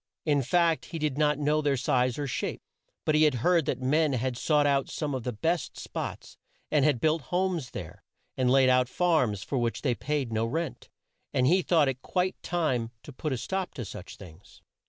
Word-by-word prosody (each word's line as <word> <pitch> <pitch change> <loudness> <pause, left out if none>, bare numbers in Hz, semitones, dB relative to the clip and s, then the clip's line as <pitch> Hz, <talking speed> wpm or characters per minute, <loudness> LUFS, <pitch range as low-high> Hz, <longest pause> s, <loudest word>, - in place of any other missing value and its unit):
In 145 -3 +3
fact 165 +5 +2
he 165 - -6
did 150 -4 -1
not 150 -1 +3
know 150 +1 +1
their 145 -2 +1
size 125 -1 +1
or 145 - -2
shape, 135 - -3 0.4
but 155 - +2
he 155 - +4
had 150 -4 +4
heard 175 -4 +3
that 130 0 -2
men 150 +2 +2
had 130 0 -1
sought 150 +4 +2
out 140 -1 +2
some 150 -3 -3
of 130 - -2
the 125 - -3
best 165 +10 -2
spots, - - -6 0.3
and 150 -3 +3
had 145 -4 +3
built 155 +3 +2
homes 180 -7 0
there, 85 -5 -8 0.3
and 130 -1 +1
laid 130 0 +5
out 125 0 +3
farms 155 - +1
for 135 - -2
which 115 -1 -2
they 130 -4 +2
paid 140 -1 -2
no 110 0 +1
rent, 160 +3 -4 0.5
and 125 - +3
he 180 +8 +4
thought 165 -5 +3
it 130 -1 -2
quite 185 +4 -1
time 135 -10 -1
to 145 - -10
put 155 +4 -4
a 130 - 0
stop 190 +8 -3
to 120 - -5
such 90 -1 -9
things. 90 0 -15
145 Hz, 210 wpm, -28 LUFS, 125-160 Hz, 0.5 s, laid